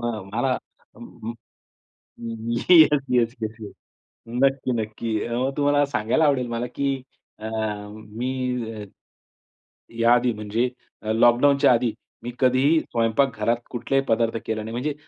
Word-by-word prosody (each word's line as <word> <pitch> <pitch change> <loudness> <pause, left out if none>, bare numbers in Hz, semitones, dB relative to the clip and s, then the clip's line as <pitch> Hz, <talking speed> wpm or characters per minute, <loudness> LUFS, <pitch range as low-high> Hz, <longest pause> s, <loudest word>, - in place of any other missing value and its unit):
अ, 120 -3 -3
मला 125 +3 +1 0.4
अम, 115 +2 -8 1.2
yes, 150 +4 +5
yes, 120 -1 +2
yes, 110 0 -3
yes, 105 - -8 0.6
नक्की, 130 +1 +1
नक्की, 110 0 -3
अ, 120 - -3 0.2
तुम्हाला 145 0 +3
सांगायला 140 +3 +1
आवडेल 135 -4 +2
मला 120 +1 -2
की 140 -1 0 0.4
अ, 110 - -6
मी 110 +2 -4 1.7
या 115 +1 +5
आधी 125 0 +2
म्हणजे 110 +3 -1 0.3
अ, 110 - -1
लॉकडाउनच्या 125 +5 +5
आधी 120 -1 +1 0.3
मी 120 +1 -5
कधीही 130 +5 +4
स्वयंपाक 115 +2 0
घरात 115 +3 +2
कुठलाही 135 +3 0
पदार्थ 115 0 +1
केले 110 -1 -2
नाही. 110 +1 -7
म्हणजे 135 +5 -2
120 Hz, 125 wpm, -24 LUFS, 110-135 Hz, 1.7 s, yes